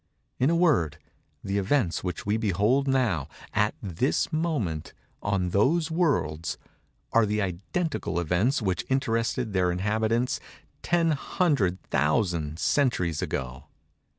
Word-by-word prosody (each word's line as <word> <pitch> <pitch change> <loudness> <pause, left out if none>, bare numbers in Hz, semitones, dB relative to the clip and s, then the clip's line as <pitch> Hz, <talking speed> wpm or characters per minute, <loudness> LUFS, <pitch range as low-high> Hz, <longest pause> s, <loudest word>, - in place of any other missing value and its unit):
In 130 - +3
a 170 - +3
word, 135 - +2 0.5
the 100 0 -1
events 100 -2 +1
which 90 -2 -4
we 105 +1 +1
behold 110 +6 +2
now—at 105 - 0
this 100 - 0
moment—in 100 - -2
those 155 - +2
worlds—are 115 - -1
the 105 +1 0
identical 100 - -2
events 95 - +1
which 95 -3 0
interested 115 -3 0
their 90 -2 +2
inhabitants 110 +6 0 0.4
ten 170 -1 +2
hundred 140 - +1
thousand 80 -1 +1
centuries 90 - +1
ago. 65 0 -4
105 Hz, 105 wpm, -27 LUFS, 90-135 Hz, 0.5 s, In